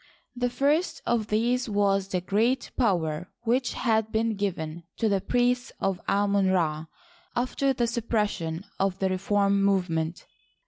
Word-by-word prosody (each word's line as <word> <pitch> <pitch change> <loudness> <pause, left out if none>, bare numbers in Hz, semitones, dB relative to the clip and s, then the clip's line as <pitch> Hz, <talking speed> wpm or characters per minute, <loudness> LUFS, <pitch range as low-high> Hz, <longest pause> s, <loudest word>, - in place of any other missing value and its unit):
The 245 0 0
first 285 +8 +1
of 230 -3 +1
these 240 +3 +1
was 200 -2 +2
the 185 -2 -1
great 225 +8 +1
power 175 - 0
which 245 +2 +1
had 220 -2 +1
been 220 0 +1
given 170 -5 -3 0.2
the 200 -4 +1
priests 245 +2 +1
of 195 -2 -1
Amon 200 -1 +2
Ra 160 -4 0 0.5
after 255 +3 +1
the 245 -2 +1
suppression 210 -7 -1
of 195 -1 +1
the 190 -1 0
reform 200 +1 +2
movement. 175 -4 0
205 Hz, 135 wpm, -27 LUFS, 185-240 Hz, 0.5 s, was